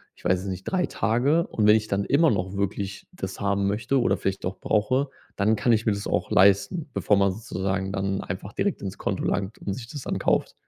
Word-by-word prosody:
ich - - -21
weiß 90 0 +2
es - - -8
nicht, 95 -1 -4
„3 185 -2 +1
Tage 140 +9 +1
und, 105 - 0
wenn 105 0 +7
ich 110 -1 0
dann 100 -1 0
immer 160 +3 +4
noch 95 -3 -1
wirklich 100 0 -3
das 95 0 -6
haben 100 0 +1
möchte 115 +7 +1
oder 100 -5 +2
vielleicht 95 0 -3
doch 95 +1 -4
brauche, 130 +7 +1 0.3
dann 105 +2 +3
kann 120 - +1
ich 115 0 +2
mir - - +5
das 100 0 -5
auch - - -1
leisten“, 100 - +3
bevor 105 - +2
man 100 -1 +3
sozusagen 95 -2 -3
dann 95 0 -1
einfach 95 +3 -6
direkt 200 - -1
ins 95 -1 -5
Konto - - -2
langt 100 +1 -1
und 100 - -4
sich 115 +2 -7
das 145 0 -7
dann - - -2
kauft. - - +1
100 Hz, 230 wpm, -25 LUFS, 95-115 Hz, 0.3 s, wenn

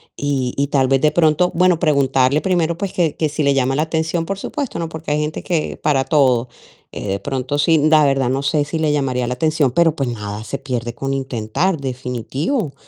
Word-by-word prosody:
y 135 -3 -1
y 140 0 +1
tal 135 -2 +2
vez, 135 0 +2
de 150 - +3
pronto 160 +2 +3
bueno, 180 0 +3
preguntarle 140 -3 +2
primero, 170 -3 0
pues, 195 +1 -4
que 165 -4 0
que 155 - +1
si 150 +1 -2
le 140 0 +3
llama 135 0 +1
la 150 - +1
atención, 160 +1 -1
por 195 +2 -4
supuesto, 280 -3 -4
¿no? 165 - -2
Porque 160 -1 -6
hay 150 - +1
gente 150 +1 -3
que 165 -4 -1
para 140 -3 +1
todo. 130 -6 +2 0.5
Eh, - - -6
de 100 0 -1
pronto 135 +1 -2
sí, 160 +2 +3
la 155 0 +4
verdad 135 -3 +2
no 135 +2 -1
sé, 145 +1 +1
si 160 - -3
le 155 -1 +1
llamaría 130 -4 0
la 125 +1 -2
atención, 155 -1 +1
pero, 165 +1 +3
pues, 135 -4 -1
nada 105 -2 -5
se 140 - -4
pierde 120 -3 -4
con 135 0 -3
intentar, 135 - -1
definitivo. 135 - -3
145 Hz, 220 wpm, -19 LUFS, 130-160 Hz, 0.5 s, la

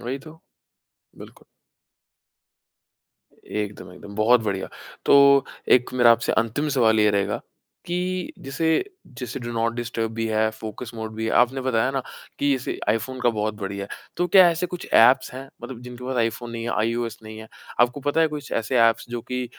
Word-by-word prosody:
वही 125 +3 -4
तो। 155 +3 -14 0.8
बिल्कुल। - - -13 2.0
एकदम, 105 -3 -5
एकदम, 100 +2 -12
बहुत 115 +3 +4
बढ़िया। 95 -2 -2 0.4
तो 140 -1 +6 0.3
एक 125 0 -4
मेरा 120 -2 +6
आपसे 115 0 0
अंतिम 120 +7 0
सवाल 110 -2 +4
ये 105 0 +4
रहेगा 100 0 0 0.5
कि 180 +1 -2
जैसे 135 +4 -3 0.5
जैसे 125 0 -5
डू 120 0 -5
नॉट 115 0 0
डिस्टर्ब 120 -2 -3
भी 115 0 -2
है, 110 0 +2
फ़ोकस 110 +2 -8
मोड 110 -1 -6
भी 110 +1 -4
है। - - -1
आपने 130 +2 -1
बताया 130 -1 +1
ना 135 -1 -2 0.4
कि 145 0 +2
इसे 130 -1 -4
आईफ़ोन 130 +4 -1
का 125 - +3
बहुत 110 -1 -2
बढ़िया 100 0 -4
है। - - -6 0.2
तो 175 - +1
क्या 185 -1 +7
ऐसे 170 +2 -2
कुछ 180 0 -7
एप्स 120 +4 +6
हैं, 135 +1 -8
मतलब 125 -3 -8
जिनके 125 0 -9
पास 130 0 -3
आईफ़ोन 115 +1 -1
नहीं 115 -1 -5
है, 120 - -2
आईओएस 115 +1 -1
नहीं 110 0 -9
है, 110 0 -10 0.3
आपको 125 +3 +2
पता 145 +4 0
है 160 - +4
कुछ 145 -2 -9
ऐसे 120 +3 0
एप्स, 115 - -2
जो 120 -1 -3
कि 125 0 -1
120 Hz, 185 wpm, -23 LUFS, 110-135 Hz, 2.0 s, क्या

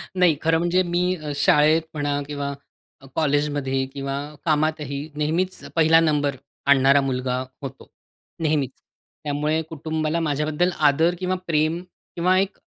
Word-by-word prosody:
नाही, 180 -4 +4
खरं 165 0 +3
म्हणजे 175 +2 +2
मी 180 +1 0
अ, 155 -4 -6
शाळेत 150 +3 +4
म्हणा 145 -1 -1
किंवा 145 -1 -3 0.6
कॉलेजमध्ये 145 -3 0
किंवा 140 0 -3 0.3
कामातही 150 -2 0
नेहमीच 165 +5 -1 0.2
पहिला 165 0 +6
नंबर 145 -3 +1 0.3
आणणारा 140 0 +5
मुलगा 130 -1 -1 0.2
होतो. 135 -3 -8 0.5
नेहमीच. 150 -4 +1 0.5
त्यामुळे 150 +2 0
कुटुंबाला 155 +1 -2
माझ्याबद्दल 150 +2 0 0.2
आदर 165 +5 +2
किंवा 185 0 0
प्रेम 160 +1 +1 0.3
किंवा 180 +2 +3
एक 195 +1 -1
155 Hz, 125 wpm, -23 LUFS, 145-165 Hz, 0.6 s, पहिला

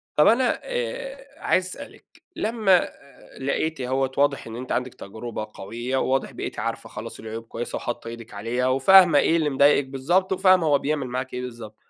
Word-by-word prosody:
طب 150 - +5
أنا 245 +2 +3
آآ - - -5
عايز 185 - +1
أسألِك 280 +10 -11
لمّا 215 -4 +3
آآ 140 - -15
لقيتِ 140 +3 -1
أهوّة، 130 +1 0
واضح 140 -3 +1
إن 115 - -7
أنتِ 125 +2 -6
عندك 125 0 -1
تجربة 110 +1 -7
قويّة، 120 +6 -4
وواضح 135 +1 0
بقيتِ - - -6
عارفة - - -4
خلاص - - -8
العيوب 110 +1 -7
كويّس 115 +1 -6
وحاطة 120 -1 -5
إيدك 115 -1 -9
عليها، 115 +5 -1
وفاهمة 150 +5 +6
إيه 165 - +3
اللي 155 -2 +1
مضايقك 140 0 +4
بالضبط، 175 +9 +1
وفاهمة 185 -2 +4
هو 145 -1 +4
بيعمل 145 -2 -2
معاكِ 130 +1 -4
إيه 125 - -3
بالضبط. 115 -4 -8
135 Hz, 175 wpm, -24 LUFS, 120-185 Hz, -, وفاهمة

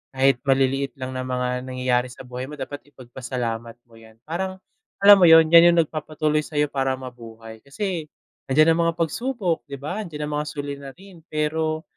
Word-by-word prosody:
kahit 135 -1 +3
maliliit 135 +1 +1
lang 130 -1 -6
na 130 - -5
mga 125 0 -2
nangyayari 125 -1 0
sa 125 - -12
buhay 125 +1 -7
mo 150 - -8
dapat 145 +1 -8
ipagpasalamat 120 -3 -6
mo 115 - -26
yan. 110 -1 -17
Parang 185 +4 -4 0.5
alam 205 0 +9
mo 180 - +6
yun 160 0 +7
yan 170 0 +9
yung 170 - +3
nagpapatuloy 155 0 -2
sayo 150 -1 -1
para 135 -1 0
mabuhay, 115 -3 -11
kasi 160 - -4 0.4
nandiyan 155 +4 +4
ang 165 - +1
mga 165 - +1
pagsubok 180 - -2
'di 140 - -6
ba, 150 +9 -5
nandiyan 155 -7 -6
ang 150 0 -4
mga 150 - -4
suliranin. 145 +6 -8
Pero 155 +1 -1
140 Hz, 175 wpm, -23 LUFS, 130-160 Hz, 0.5 s, alam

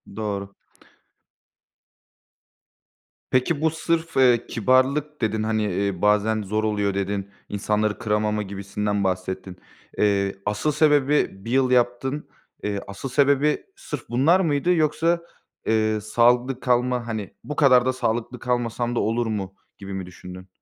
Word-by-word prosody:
Doğru. 100 -2 -4 2.8
Peki, 140 +4 +1
bu 160 - +3
sırf, 165 0 -2
eee, 125 -3 +4
kibarlık 130 +5 +1
dedin, 110 0 0
hani, 110 -1 0
eee, 100 -1 -1
bazen 105 +1 +2
zor 105 +2 -1
oluyor 105 -2 0
dedin, 100 0 -3 0.2
insanları 105 +1 0
kıramama 105 -1 0
gibisinden 100 +1 -3
bahsettin. 95 0 -3 0.4
Eee, 100 -1 +2
asıl 105 +9 0
sebebi 150 -1 +3 0.2
1 115 - -4
yıl 130 -1 +3
yaptın. 125 +4 +1 0.4
Eee, 100 -1 -1
asıl 100 +7 -6
sebebi 140 +2 +2
sırf 150 - -7
bunlar 145 +10 +4
mıydı 165 0 +2
yoksa, 165 +2 +1 0.4
eee, 110 -1 +1
sağlıklı 120 +4 +2
kalma, 125 -1 +1
hani, 110 -3 -4
"Bu 150 - -5
kadar 130 -3 +5
da 130 - +1
sağlıklı 120 0 -2
kalmasam 120 -1 -1
da - - +1
olur 115 +1 0
mu?" 95 -3 -4 0.2
gibi 100 0 -8
mi 95 -2 -4
düşündün? 90 +1 -11
115 Hz, 130 wpm, -23 LUFS, 105-135 Hz, 2.8 s, kadar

